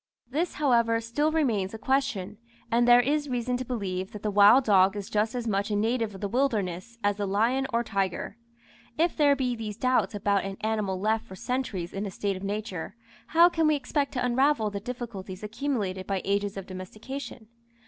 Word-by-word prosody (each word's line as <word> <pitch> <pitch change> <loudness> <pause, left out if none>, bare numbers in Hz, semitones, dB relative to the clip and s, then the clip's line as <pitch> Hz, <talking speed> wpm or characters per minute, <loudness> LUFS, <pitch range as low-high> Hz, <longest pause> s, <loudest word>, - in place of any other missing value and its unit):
This, 330 +6 -1
however, 235 -5 +3
still 265 +7 0
remains 225 -11 0
a - - -5
question, 215 -6 -1 0.3
and 240 +1 +3
there 245 0 +8
is 290 +3 0
reason 250 0 -1
to 255 - -3
believe 195 -7 -4
that 210 - -8
the 210 - 0
wild 205 +6 +7
dog 195 -3 +4
is 205 -1 -6
just 215 +3 0
as 240 -1 -3
much 200 0 0
a 210 - 0
native 225 0 0
of 190 - -10
the 205 - -1
wilderness 230 -3 -1
as 205 0 +1
the 205 -1 -2
lion 235 +7 +1
or 235 0 +1
tiger. 195 -2 -2 0.6
If 335 +2 +2
there 290 -2 +4
be 255 -3 -1
these 215 -2 -6
doubts 235 -5 +1
about 200 -1 +1
an 195 0 -5
animal 215 -4 -1
left 220 +3 0
for 190 - -10
centuries 205 -6 -3
in 200 +1 -3
a - - -4
state 195 +1 -2
of 185 - -7
nature, 200 -2 -4 0.3
how 335 +2 +6
can 325 -3 +1
we 305 - +4
expect 280 +1 -1
to 250 -2 -1
unravel 250 -3 +2
the 200 - -4
difficulties 205 -5 -7
accumulated 210 -5 -3
by 195 -2 -1
ages 200 0 0
of 195 - -5
domestication? 215 +6 -8
220 Hz, 200 wpm, -27 LUFS, 200-255 Hz, 0.6 s, there